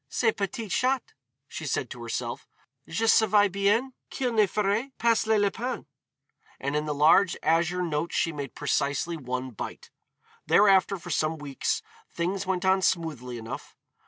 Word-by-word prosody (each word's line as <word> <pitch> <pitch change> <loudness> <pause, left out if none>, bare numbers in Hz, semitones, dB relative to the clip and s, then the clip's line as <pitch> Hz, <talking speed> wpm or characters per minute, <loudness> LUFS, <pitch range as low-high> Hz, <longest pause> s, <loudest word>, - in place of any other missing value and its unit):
"Ce 225 -2 +2
p'tit 210 +1 -4
chat," 260 0 0 0.3
she 155 - -6
said 130 - -1
to 120 - -8
herself, 115 -1 -4 0.4
"je 220 +7 -1
savais 215 -2 +5
bien 205 +7 +1 0.2
qu'il 250 -3 -2
ne 215 -2 +4
ferait 210 +6 0
pas 230 -1 +2
le 220 -1 +4
lapin." 215 +4 -1 0.7
And 140 +2 -2
of 150 0 -1
the 150 - 0
large 165 +5 +5
azure 170 +3 +2
notes 165 0 -2
she 165 - +1
made 145 -3 -6
precisely 145 +3 0
one 130 -3 -4
bite. 110 - -8 0.6
Thereafter 195 -1 +5
for 175 0 -8
some 155 +1 0
weeks 145 -3 -2 0.3
things 185 +3 -2
went 190 -1 -1
on 190 0 +4
smoothly 150 -10 -1
enough. 115 0 -8
180 Hz, 155 wpm, -27 LUFS, 150-210 Hz, 0.7 s, savais